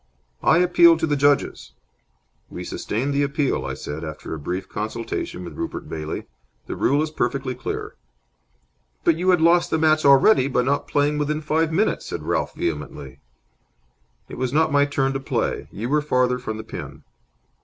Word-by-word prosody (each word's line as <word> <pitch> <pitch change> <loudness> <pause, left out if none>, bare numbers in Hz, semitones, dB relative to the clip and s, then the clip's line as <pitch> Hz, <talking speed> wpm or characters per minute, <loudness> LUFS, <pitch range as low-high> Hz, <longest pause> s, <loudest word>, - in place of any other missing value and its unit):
"I 160 - +4
appeal 175 -1 +6
to 160 - 0
the 150 -2 0
judges." 140 - +1 0.8
"We - - -7
sustain 125 +7 -3
the 140 0 +1
appeal," 145 0 0
I - - -4
said, 75 +3 -6
after 75 0 -6
a 80 - -5
brief 90 +6 -4
consultation 110 -3 -4
with 85 - -8
Rupert - - -5
Bailey. 80 -1 -5 0.4
"The - - -5
rule 145 +3 +2
is 155 - -4
perfectly 135 -4 -1
clear." 125 - -5 1.1
"But 160 - +3
you 180 +2 0
had 180 -3 +4
lost 170 +1 +4
the 160 - +1
match 155 -1 +3
already 140 +2 +6
by 125 -2 +1
not 140 +3 0
playing 145 +1 +1
within 150 +1 -1
five 160 +1 0
minutes," 200 +7 0
said - - -5
Ralph, - - -1
vehemently. 75 -4 -4 1.1
"It - - -9
was 130 -1 -1
not 155 +2 +2
my 145 0 +4
turn 135 -1 0
to 135 - -2
play. 135 - -2
You 110 +4 -4
were 150 +3 +2
farther 125 -3 +1
from 110 -3 -5
the 110 - -6
pin." - - -8
140 Hz, 175 wpm, -23 LUFS, 115-155 Hz, 1.1 s, appeal